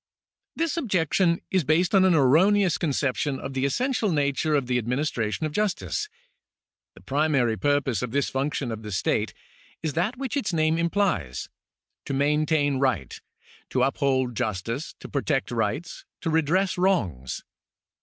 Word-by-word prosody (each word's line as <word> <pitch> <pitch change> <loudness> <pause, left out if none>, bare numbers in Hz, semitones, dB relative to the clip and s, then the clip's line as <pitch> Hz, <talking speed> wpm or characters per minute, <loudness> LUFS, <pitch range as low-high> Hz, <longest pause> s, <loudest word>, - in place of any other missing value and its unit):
This 335 +1 -1
objection 180 - +1
is 185 -3 +2
based 160 +5 +2
on 190 -1 +6
an 185 -3 +4
erroneous 175 +7 +4
conception 140 -2 0
of 135 - -6
the 135 0 0
essential 240 - 0
nature 145 0 +1
of 140 -3 +1
the 125 0 +1
administration 125 +1 -1
of 155 - -2
justice. 210 - -1 0.9
The - - -15
primary 140 -5 +1
purpose 145 -5 +1
of 125 - -2
this 140 +3 0
function 135 -2 -2
of 110 -1 -5
the 105 -1 -7
state 95 - 0 0.5
is 155 -3 -1
that 190 - -1
which 265 -2 -3
its 240 -10 -1
name 160 0 +2
implies 170 - 0 0.3
— - - -60
to 135 - -1
maintain 145 0 +2
right, 130 -3 -1 0.5
to - - +1
uphold 135 -2 +1
justice, 115 - -3
to - - -7
protect - - -1
rights, - - -2 0.2
to 165 - -1
redress 170 +4 +1
wrongs. 95 - 0
150 Hz, 150 wpm, -25 LUFS, 130-180 Hz, 0.9 s, on